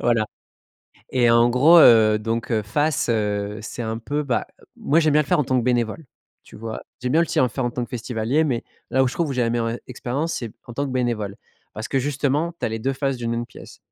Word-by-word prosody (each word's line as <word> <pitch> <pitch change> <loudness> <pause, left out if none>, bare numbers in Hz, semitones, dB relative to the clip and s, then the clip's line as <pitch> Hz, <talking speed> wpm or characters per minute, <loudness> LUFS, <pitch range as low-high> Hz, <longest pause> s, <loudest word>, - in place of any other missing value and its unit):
voilà. 115 -2 +2 0.9
Et 120 -2 +3
en 115 +1 +5
gros, 150 +8 +6
heu, 110 -4 +7
donc 115 +2 -3
heu, 110 -1 +1
face, 145 +7 0
heu, 105 -1 -1
c'est 120 - -6
un 110 0 -3
peu, 145 +6 -2
bah, 125 -3 -1 0.3
moi, 155 +4 +1
j'aime 155 -2 +2
bien 150 - +5
le 140 - -12
faire - - +2
en - - 0
tant 130 0 +1
que 120 - +1
bénévole, 120 +4 0 0.4
tu - - -14
vois? 110 0 -6 0.2
J'aime 125 +1 -2
bien 160 - +4
aussi 170 - -2
le 130 - +4
faire 125 +3 -3
en 120 - 0
tant 120 +1 -3
que - - -15
festivalier, 120 +4 -1
mais 125 -6 -1 0.3
là 130 +1 +3
où - - +1
je - - -6
trouve 170 -3 0
où - - -1
j'ai 125 -2 0
la 115 - +1
meilleure 115 -1 0
e 115 - -4
expérience, 135 +6 -3
c'est 115 -3 -4 0.2
en 120 - -8
tant 140 - -1
que - - -5
bénévole 115 -6 -1 0.4
parce 110 - -5
que 135 - +1
justement, 145 +4 0
tu - - -1
as - - 0
les 110 - -3
2 135 +5 -1
faces 135 -1 -1
d'une 115 -1 -3
même 120 0 -2
pièce. - - -13
120 Hz, 260 wpm, -22 LUFS, 115-135 Hz, 0.9 s, heu